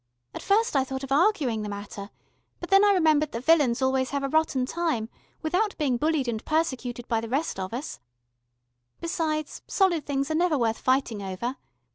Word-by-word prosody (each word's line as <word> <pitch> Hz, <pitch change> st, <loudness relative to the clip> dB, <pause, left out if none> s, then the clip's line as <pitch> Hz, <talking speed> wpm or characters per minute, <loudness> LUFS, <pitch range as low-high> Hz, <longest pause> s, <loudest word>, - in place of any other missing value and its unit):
At -, -, -6 dB
first 435 Hz, -1 st, +2 dB
I 270 Hz, -, +4 dB
thought 265 Hz, 0 st, -5 dB
of 270 Hz, -, -7 dB
arguing 285 Hz, -, +2 dB
the 210 Hz, -, -4 dB
matter, 200 Hz, 0 st, -7 dB, 0.5 s
but 350 Hz, -, -8 dB
then 390 Hz, +1 st, +7 dB
I 410 Hz, -, +6 dB
remembered 310 Hz, -5 st, +3 dB
that 235 Hz, +2 st, -5 dB
villains 275 Hz, -6 st, +4 dB
always 260 Hz, 0 st, +1 dB
have 280 Hz, 0 st, -2 dB
a 275 Hz, -, -1 dB
rotten 300 Hz, -4 st, +1 dB
time, 305 Hz, -8 st, -2 dB, 0.3 s
without 375 Hz, +6 st, 0 dB
being 275 Hz, -6 st, +1 dB
bullied 305 Hz, -1 st, 0 dB
and 225 Hz, -2 st, -3 dB
persecuted 260 Hz, -6 st, -2 dB
by 225 Hz, -2 st, 0 dB
the 230 Hz, -, -6 dB
rest 275 Hz, -3 st, -1 dB
of 190 Hz, 0 st, -4 dB
us. 250 Hz, -, -5 dB, 1.0 s
Besides 310 Hz, -2 st, -2 dB
solid 350 Hz, -6 st, +1 dB
things 275 Hz, +1 st, -1 dB
are -, -, +1 dB
never 330 Hz, -1 st, +2 dB
worth 230 Hz, -3 st, 0 dB
fighting 255 Hz, -5 st, +1 dB
over. 195 Hz, +7 st, -4 dB
275 Hz, 185 wpm, -26 LUFS, 240-320 Hz, 1.0 s, then